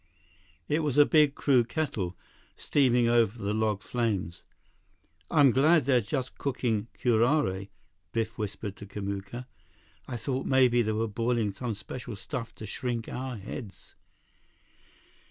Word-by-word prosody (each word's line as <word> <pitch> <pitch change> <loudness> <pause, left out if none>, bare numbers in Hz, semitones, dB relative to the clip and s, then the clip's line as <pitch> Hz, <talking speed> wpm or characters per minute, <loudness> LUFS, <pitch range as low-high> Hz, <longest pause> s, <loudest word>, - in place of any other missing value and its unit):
It 150 +2 +1
was 150 -4 -1
a 145 - +8
big, 150 -2 +4
crude 125 -4 +3
kettle, 100 - -2 0.4
steaming 125 -4 +2
over 115 -1 +3
the 100 -1 -2
log 110 -2 0
flames. 105 -8 -2 0.9
"I'm 140 -3 +6
glad 150 +5 +4
they're 130 -3 +4
just 130 +4 -4
cooking 120 -6 -1
curare," 115 -4 +2 0.4
Biff 115 -1 -2
whispered 105 -1 -5
to 105 - -10
Kamuka. 100 +4 -5 0.6
"I 125 - -4
thought 130 +3 -3
maybe 125 -2 +4
they 110 -1 0
were 110 +1 0
boiling 115 -1 0
some 120 0 -4
special 115 +3 -7
stuff 115 +3 -6
to 110 - -8
shrink 120 +2 -3
our 130 -1 -4
heads." 105 +1 -9
120 Hz, 135 wpm, -28 LUFS, 105-130 Hz, 0.9 s, a